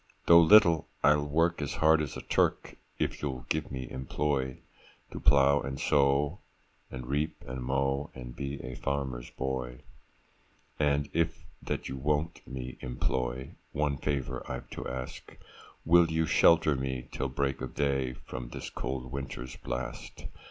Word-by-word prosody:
Though 85 0 +9
little, 85 -2 +6 0.2
I'll 75 0 +4
work 80 +3 +2
as 70 - -2
hard 80 0 +5
as 75 - -4
a - - -7
Turk, - - +1 0.2
If - - -2
you'll 65 -4 -3
give 80 -1 -1
me 65 -2 -4
employ, 65 0 -1 0.5
To - - -6
plow 70 +1 +5
and 65 +1 -4
sow, 70 +3 +2 0.5
and 65 -1 -7
reap 75 +5 -2
and 65 0 -5
mow, 70 +2 0
And 60 -2 -8
be 70 0 -4
a 65 +1 -5
farmer's 65 -2 -3
boy. 65 -2 -4 1.0
'And 75 -1 +2
if 85 0 0 0.2
that - - -3
you 65 - -5
won't 75 +4 -1
me 65 -1 -6
employ, 65 +1 -2 0.2
One 75 -1 0
favour 65 -3 -2
I've 65 - -6
to - - -5
ask,— 65 0 -7 0.5
Will 85 0 +6
you 80 0 +1
shelter 80 -1 +5
me, 65 -2 -3
till 65 - -2
break 70 0 -1
of 65 - -6
day, 70 -3 +1
From 65 -1 -8
this - - -7
cold 65 -1 -4
winter's 65 -2 -5
blast? 65 0 -6
70 Hz, 150 wpm, -30 LUFS, 65-75 Hz, 1.0 s, Though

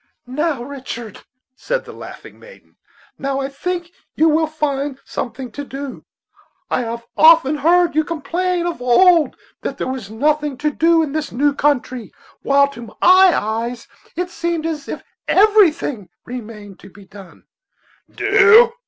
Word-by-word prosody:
"Now, 275 +1 -2
Richard," 245 -5 -8 0.3
said - - -3
the - - -10
laughing - - -11
maiden, - - -17 0.4
"now 275 0 -2
I 270 0 -3
think 345 +4 -4 0.2
you 320 +1 +4
will 315 +1 +2
find 290 -3 -2
something 255 +1 -6
to 285 - -6
do. 275 -1 -8 0.7
I - - +1
have 235 0 -5
often 315 -2 +6
heard 345 +3 +3
you 310 +1 +2
complain 345 +2 -2
of 345 -6 -4
old 325 +7 +4 0.3
that - - -5
there - - -3
was 260 -6 -5
nothing 295 +4 0
to 300 +3 -1
do 330 +2 +3
in 295 - -4
this 310 0 -3
new 285 +4 +1
country, 255 -5 -1 0.3
while 280 0 +3
to 260 -4 -11
my 215 - -15
eyes 240 - +3 0.3
it 360 +2 -3
seemed 340 -2 -3
as 310 -3 -4
if - - -6 0.2
everything 340 - +3 0.2
remained 210 -5 -9
to 195 - -14
be 195 +1 -16
done." 195 0 -15 0.7
"Do!" 430 +3 +5
290 Hz, 150 wpm, -19 LUFS, 250-335 Hz, 0.7 s, often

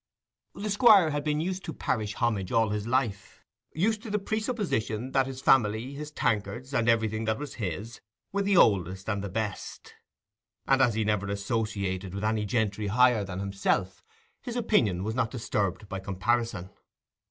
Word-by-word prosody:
The 210 +1 -3
Squire 205 -6 +6
had 145 0 -2
been 150 0 0
used 185 +3 -3
to 165 - -5
parish 105 -2 -2
homage 105 -6 -1
all 115 -1 +3
his 105 +1 -3
life, 115 -6 -2 0.3
used 215 +6 0
to 225 - -8
the 210 - +1
presupposition 200 - -2
that 135 -1 +2
his 130 -1 -7
family, 115 +1 +3
his 150 +1 -6
tankards, 120 -1 -2
and 120 -2 +2
everything 110 -1 +1
that 110 0 0
was 145 -2 -6
his, 105 +5 -5 0.3
were 200 - 0
the 200 -1 +2
oldest 95 - +3
and 100 -3 -2
best; 105 -1 -5 0.7
and 135 0 +3
as 120 -5 +3
he 110 - +1
never 105 -1 0
associated 100 -3 -2
with 100 - -4
any 110 -1 0
gentry 105 -1 0
higher 120 +1 +4
than 95 -2 -6
himself, 95 -1 -1 0.4
his 245 -2 -6
opinion 125 - +2
was 110 +2 -2
not 120 -2 0
disturbed 105 -4 -2
by 95 - -5
comparison. 100 0 -1
110 Hz, 165 wpm, -28 LUFS, 100-135 Hz, 0.7 s, Squire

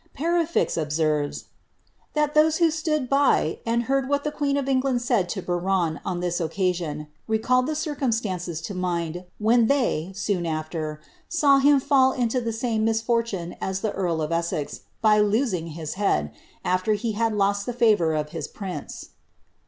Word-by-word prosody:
Perefixe 335 - +1
observes, 150 -1 0
^ - - -28 0.7
that 300 -1 +1
those 310 +1 +4
who 335 -2 +4
stood 305 -3 -1
by, 275 - +2
and 235 +1 +1
heard 270 +2 0
what 285 0 +1
the 300 - -1
queen 285 -1 0
of 275 -1 -2
England 260 -2 +1
said 230 -8 +1
to 190 -4 -4
Biron 175 -2 0
on 180 -2 -3
this 175 0 -1
occasion, 165 -3 -1 0.2
readied 250 +4 +2
the 310 - -1
circiunstances 225 - -2
to 200 - -5
mind, 175 -1 -2
when 225 +2 +3
they, 235 - +1
soon 195 -4 -1
after, 155 -1 -4 0.3
saw 285 -5 +4
him 285 +1 +5
fidl 265 -1 +3
into 245 0 +1
the 230 -1 -2
same 225 -1 -1
misfortune 225 -5 0
as 190 0 -2
the 215 - -1
earl 170 -4 -1
of 155 - -3
Essex, 165 -3 -2 0.2
by 215 -1 +5
losing 210 -5 +1
his 160 -1 -5
head, 75 - 0 0.3
after 185 +4 +1
he 225 +2 -1
had 225 +2 0
lost 200 0 +1
the - - 0
favour 210 -9 +3
of 150 0 -2
his - - -4
prince.'' 185 -7 -7
215 Hz, 170 wpm, -24 LUFS, 175-260 Hz, 0.7 s, him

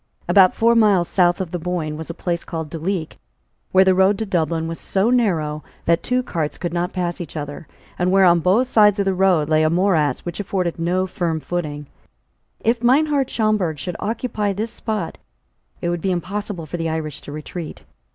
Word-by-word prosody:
About 190 -2 +5
four 230 +1 +4
miles 205 -6 +4
south 175 -2 +2
of 185 -3 -4
the 175 - -3
Boyne 165 -3 -3
was 160 +1 -7
a 170 - -5
place 170 -1 -2
called 160 -3 -5
Duleek, 165 0 -3 0.5
where 190 0 +5
the 190 - +5
road 190 +2 +3
to 220 - -2
Dublin 165 -4 -1
was 165 0 -5
so 200 +5 +1
narrow, 160 -11 +1 0.2
that 170 0 +3
two 250 0 0
cars 160 -9 -3
could 175 -1 -4
not 175 0 -1
pass 175 -1 -3
each 165 -1 -7
other, 145 +2 -6 0.3
and 180 +1 +2
where 195 0 +5
on 175 -1 +5
both 190 +9 +3
sides 210 -5 +4
of 200 - 0
the 195 - +2
road 180 -5 +3
lay 155 0 +3
a 155 - +3
morass 165 -6 +2
which 175 +1 -6
afforded 185 -4 -2
no 180 +3 +1
firm 175 -4 -2
footing. 150 -3 -4 0.8
If 230 +1 +1
Meinhart 275 +2 +3
Schomberg 210 -8 0
should 175 +4 -5
occupy 215 -2 -2
this 220 +4 -3
spot, 215 -7 -4 0.6
it 175 - -1
would 175 -1 -2
be 190 - -1
impossible 185 0 -3
for 165 +3 -5
the 165 -1 -2
Irish 155 -2 -4
to - - -9
retreat. 155 +2 -7
180 Hz, 200 wpm, -21 LUFS, 165-200 Hz, 0.8 s, About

